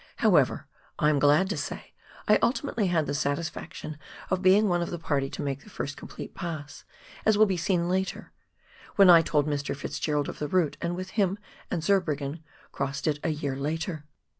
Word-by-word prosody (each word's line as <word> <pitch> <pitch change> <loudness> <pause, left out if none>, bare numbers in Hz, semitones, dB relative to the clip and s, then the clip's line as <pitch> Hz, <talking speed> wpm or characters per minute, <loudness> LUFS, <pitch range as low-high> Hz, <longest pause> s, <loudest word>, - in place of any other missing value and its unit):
However, - - +3 0.3
I 150 - +3
am 145 - +2
glad 150 +7 +4
to - - -2
say - - -6 0.3
I - - +5
ultimately 235 -4 +1
had 165 -4 +1
the - - -2
satisfaction 150 +1 -3 0.3
of 185 - +1
being 195 +3 +5
one 175 -2 +1
of 170 - -2
the 175 - -4
party 140 -4 -1
to - - -5
make 140 -1 -3
the - - -15
first 145 - -5
complete - - -9
pass, 155 -5 -6 0.4
as 220 -1 +4
will 215 - +7
be 195 -3 0
seen 175 0 0
later, 190 +1 -2 0.6
when 195 -3 +8
I 170 -1 +9
told 150 -3 +1
Mr. 145 -2 -2
Fitz 140 - -5
Gerald 150 -2 0
of - - -7
the 150 - -2
route, 170 -2 +1
and 170 +1 -1
with 185 +1 -6
him 200 -2 +1 0.3
and 165 -3 -2
Zurbriggen 155 -6 0 0.3
crossed 140 0 -3
it 150 -2 +1
a - - +1
year 145 -3 -2
later. 155 +2 -3
160 Hz, 195 wpm, -27 LUFS, 145-185 Hz, 0.6 s, I